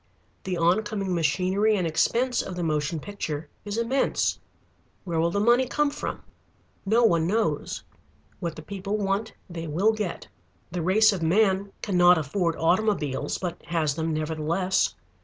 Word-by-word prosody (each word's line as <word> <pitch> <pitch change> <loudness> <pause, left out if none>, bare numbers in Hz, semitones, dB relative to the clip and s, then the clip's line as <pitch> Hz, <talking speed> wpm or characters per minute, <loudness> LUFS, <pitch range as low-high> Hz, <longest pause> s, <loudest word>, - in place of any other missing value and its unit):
The 185 -2 -2
oncoming 195 +3 +1
machinery 185 +6 +2
and 180 - 0
expense 235 +10 +1
of 185 - -6
the 175 - -3
motion 155 0 -1
picture 160 -4 -5 0.2
is 205 +1 -3
immense. 235 +4 +1 0.6
Where 170 -3 -2
will 165 +1 +2
the 200 - -1
money 240 +4 +4
come 295 +2 +1
from? - - -5 0.6
No 230 +4 +4
one 170 -7 +3
knows. 190 -7 -1 0.6
What 170 -2 -3
the 155 - -9
people 200 +4 -3
want 200 +2 -1
they 165 -2 -6
will 190 +9 +2
get. 210 -5 -4 0.4
The 175 0 -2
race 210 +5 +4
of 185 - -4
man 195 +3 +2
cannot 180 -3 +5
afford 165 +3 -1
automobiles, 165 -6 0
but 180 -3 -5
has 160 -4 0
them 160 +2 -2
nevertheless. 160 +4 0
180 Hz, 150 wpm, -26 LUFS, 165-210 Hz, 0.6 s, cannot